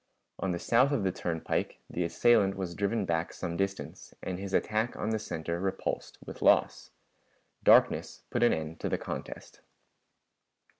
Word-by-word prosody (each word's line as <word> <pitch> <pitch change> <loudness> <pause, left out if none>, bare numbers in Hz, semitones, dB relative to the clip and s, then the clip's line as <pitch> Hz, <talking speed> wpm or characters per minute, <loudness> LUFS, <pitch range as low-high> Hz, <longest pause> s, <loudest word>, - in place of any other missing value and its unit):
On 95 0 -1
the 85 - -1
south 125 +9 +3
of 140 -8 +1
the 95 - +1
turnpike 85 -2 -2
the 90 - -2
assailant 100 +3 +3
was 90 -3 -3
driven 100 +3 0
back 85 0 -1
some 85 -2 -4
distance, 95 +2 -4
and 90 -1 -4
his 100 0 -5
attack 110 +4 0
on 110 - -2
the 110 - 0
center 85 -4 -4
repulsed 95 +1 -3
with - - -9
loss. - - +3 0.7
Darkness - - +4
put - - 0
an 120 - +5
end 80 +1 -3
to - - -2
the - - 0
contest. - - -7
95 Hz, 160 wpm, -30 LUFS, 85-110 Hz, 0.7 s, an